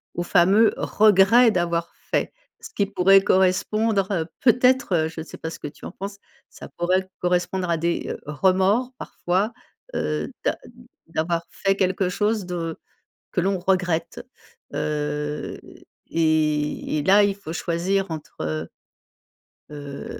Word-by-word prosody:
au 175 - -1
fameux 195 +5 +4
regret 215 +3 +5
d'avoir 170 -2 -1 0.2
fait. - - 0 0.3
Ce 460 - -9
qui 200 - 0
pourrait 195 0 +5
correspondre, 195 +2 +2
heu, 170 -5 0 0.2
peut-être, 250 -2 +3
heu, 160 -1 +2
je 160 0 -7
sais - - -11
pas 160 - -5
ce - - -9
que - - -5
tu 145 - -14
en - - -6
penses, 200 +1 -7 0.3
ça - - -11
pourrait 185 +2 +1
correspondre 180 +1 0
à 170 - +2
des, 170 +1 -1
heu, - - -5
remords 190 - +2
parfois, 190 +6 -2 0.4
heu, - - -2
d'a - - +1 0.5
d'avoir 165 +1 -1
fait 195 0 0
quelque 190 0 +1
chose 210 +1 0
de 170 -2 -4 0.5
que - - +1
l'on 190 +2 0
regrette, 175 -3 0 0.5
heu 150 0 -3 0.5
et 155 -2 0
et - - -1
là, 200 +4 +6
il 200 -1 +1
faut 200 -6 -8
choisir 180 +3 -1
entre 155 -2 -7
heu 80 +1 -3 1.0
heu, 145 -2 -8
180 Hz, 145 wpm, -23 LUFS, 165-195 Hz, 1.0 s, là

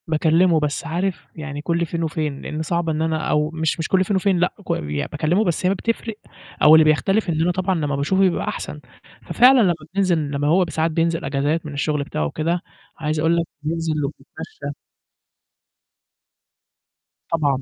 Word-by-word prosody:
باكلمه، 165 +2 +3
بس 150 +2 -2
عارف 175 +1 -2
يعني 150 -2 -6
كُلّ 170 +2 0
فين 170 +1 -3
وفين، 155 -3 -3
لإن 155 - -4
صعب 170 +1 -1
إن 155 0 -1
أنا 160 -1 -1
أو 150 0 +2
مش 160 0 -1
مش 160 - -2
كُلّ 190 -1 +3
فين 195 +2 -1
وفين 190 -1 +2
لأ، 180 +1 +1
ك - - -1 0.4
باكلمه، 160 +7 +1
بس 175 -2 -1
هي - - +4
ما 195 - +1
بتفرق 230 +1 -3 0.5
أو 155 +1 +8
اللي 160 - +7
بيختلف 195 +7 +2
إن 160 -1 0
أنا 175 +2 +2
طبعًا 185 +1 0
لمّا 150 -4 -1
باشوفه 155 +8 +1
بيبقى 185 -3 +2
أحسن، - - -5 0.4
ففعلًا 255 +1 +5
لمّا 185 -5 +4 0.2
بننزل 185 -4 +2
لمّا 145 0 -1
هو 180 +4 +4
ب - - -9
ساعات 160 +1 0
بينزل 165 0 0
إجازات 145 +4 -1
من 150 - -6
الشغل 150 0 -1
بتاعه 75 - -3
وكده، 165 - -1 0.4
عايز 155 -1 -2
أقول 165 +2 +2
لك 170 - +1 0.2
بننزل 165 +1 -1
وبنتمشى. 415 - -8 2.6
طبعًا. 145 -5 +1
165 Hz, 180 wpm, -21 LUFS, 155-180 Hz, 2.6 s, أو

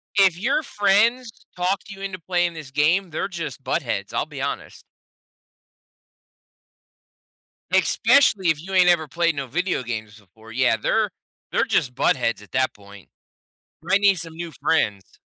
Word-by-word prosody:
If 190 -4 +4
your 270 +9 +1
friends 225 +2 +2 0.2
talk 180 +2 0
you 200 -1 -10
into 195 -1 -5
playing 175 0 0
this 155 -4 -9
game, 165 +7 +2
they're 160 - -2
just 175 -4 -6
buttheads. - - -2
I'll - - 0
be - - -8
honest. - - -5 2.9
Especially 205 -10 +4
if 155 -2 +1
you 190 +3 -8
ain't 185 -1 +5
ever 165 -3 +3
played 170 +2 0
no 140 -1 -3
video 175 +2 -1
games 110 -3 -6
before. 110 +3 -17
Yeah. 120 -1 +2
They're - - +1 0.4
they're - - +2
just 125 - 0
buttheads 115 -5 +1
at 105 - -18
that 130 0 +1
point. 100 -1 -15 0.7
Might 185 +5 +1
need 200 -1 +5
some 165 -2 -6
new 170 0 -6
friends. 105 -11 -1
170 Hz, 150 wpm, -23 LUFS, 130-190 Hz, 2.9 s, ain't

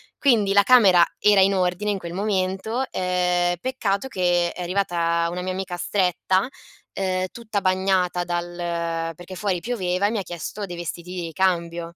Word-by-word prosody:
Quindi 220 -8 +3
la 200 - +7
camera 200 -6 +6
era 205 -2 +5
in 195 +1 +4
ordine 185 +2 0
in 205 - 0
quel 170 -2 -7
momento, 195 +4 -1
ehm, 180 -1 +1
peccato 225 -2 -1
che 175 -6 +1
è 180 - -8
arrivata 170 -2 0
una 180 +1 -4
mia 185 +1 -3
amica 185 -1 -4
stretta, 185 +1 +1 0.5
ehm, 185 -1 -1
tutta 220 -3 -3
bagnata 185 -1 +1
dal 175 0 -3 0.6
perché 175 +3 -11
fuori 185 -1 -1
pioveva 190 -5 -1
e 205 - +2
mi 225 - -1
ha - - -1
chiesto 180 +4 -6
dei 175 - -6
vestiti 175 +1 -6
di 180 -1 -4
ricambio. 170 0 -1
185 Hz, 165 wpm, -23 LUFS, 175-200 Hz, 0.6 s, la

